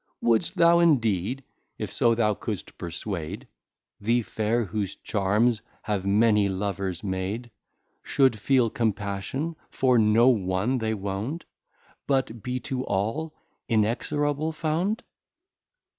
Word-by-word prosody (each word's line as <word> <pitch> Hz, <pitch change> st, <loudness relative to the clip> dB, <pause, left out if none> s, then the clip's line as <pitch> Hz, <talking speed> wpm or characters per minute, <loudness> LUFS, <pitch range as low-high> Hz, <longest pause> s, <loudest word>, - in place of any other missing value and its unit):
Wouldst 115 Hz, -2 st, +2 dB
thou, 170 Hz, 0 st, +5 dB
indeed, 125 Hz, -, +2 dB, 0.3 s
if -, -, -4 dB
so 115 Hz, -1 st, +3 dB
thou 110 Hz, -2 st, +2 dB
couldst -, -, -6 dB
perswade, 85 Hz, -1 st, -5 dB, 0.5 s
The 115 Hz, +3 st, +1 dB
Fair, 110 Hz, +2 st, 0 dB
whose 100 Hz, -1 st, -3 dB
Charms 105 Hz, +3 st, +1 dB, 0.2 s
have 100 Hz, -2 st, -2 dB
many 105 Hz, 0 st, +4 dB
Lovers 95 Hz, -2 st, -3 dB
made, 100 Hz, +5 st, -3 dB, 0.5 s
Should 130 Hz, -6 st, +2 dB
feel 125 Hz, 0 st, +3 dB
Compassion 110 Hz, +8 st, -2 dB
for 125 Hz, -2 st, +3 dB
no 110 Hz, +3 st, +5 dB
one 105 Hz, +2 st, +2 dB
they 110 Hz, -1 st, -1 dB
wound, 100 Hz, -, -4 dB, 0.6 s
But 130 Hz, -5 st, 0 dB
be 125 Hz, +2 st, -3 dB
to 130 Hz, +1 st, -3 dB
all 115 Hz, +12 st, -2 dB, 0.3 s
Inexorable 145 Hz, +7 st, 0 dB
found? 170 Hz, +9 st, -1 dB
110 Hz, 115 wpm, -26 LUFS, 100-130 Hz, 0.6 s, thou